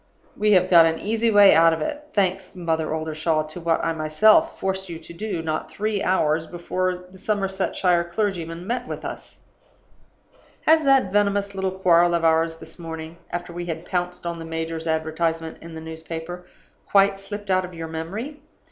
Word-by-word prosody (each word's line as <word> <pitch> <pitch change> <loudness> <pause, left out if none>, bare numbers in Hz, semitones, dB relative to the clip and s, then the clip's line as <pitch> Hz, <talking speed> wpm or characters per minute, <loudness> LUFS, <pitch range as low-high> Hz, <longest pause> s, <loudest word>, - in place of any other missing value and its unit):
We 210 0 +3
have 185 -1 +4
got 170 -3 +7
an 160 0 0
easy 225 +4 0
way 205 -2 +7
out 165 0 +6
of 160 - -3
it 295 - -4
thanks, 190 -4 -1
Mother 160 -3 -1
Oldershaw, 155 0 -1
to 155 +3 -9
what 165 -1 +1
I 165 - +1
myself 210 - +3
forced 190 -1 -2
you 170 - -5
to 170 - -11
do, 185 -2 -4
not 155 -1 -3
three 210 -1 -2
hours 160 -3 +1
before 180 +2 -2 0.2
the 190 - -14
Somersetshire 190 -3 0
clergyman 170 -3 -3
met 245 +3 -2
with - - -6
us. - - -8 1.2
"Has 315 0 +5
that 270 -8 +4
venomous 200 -1 +1
little 190 0 -1
quarrel 175 -2 +4
of 170 - -1
ours 165 0 +2
this 160 +2 -12
morning 160 0 -7
after 175 0 -5
we 175 0 -5
had 165 -1 -4
pounced 180 -1 -3
on 170 -1 -3
the - - -6
major's 165 0 -4
advertisement 160 +1 -1
in 165 0 -10
the 160 - -7
newspaper 160 +2 -7 0.4
quite 195 0 +4
slipped 205 0 -6
out 185 0 +3
of 180 -1 -8
your 165 0 -5
memory? 195 - -5
175 Hz, 180 wpm, -23 LUFS, 160-195 Hz, 1.2 s, got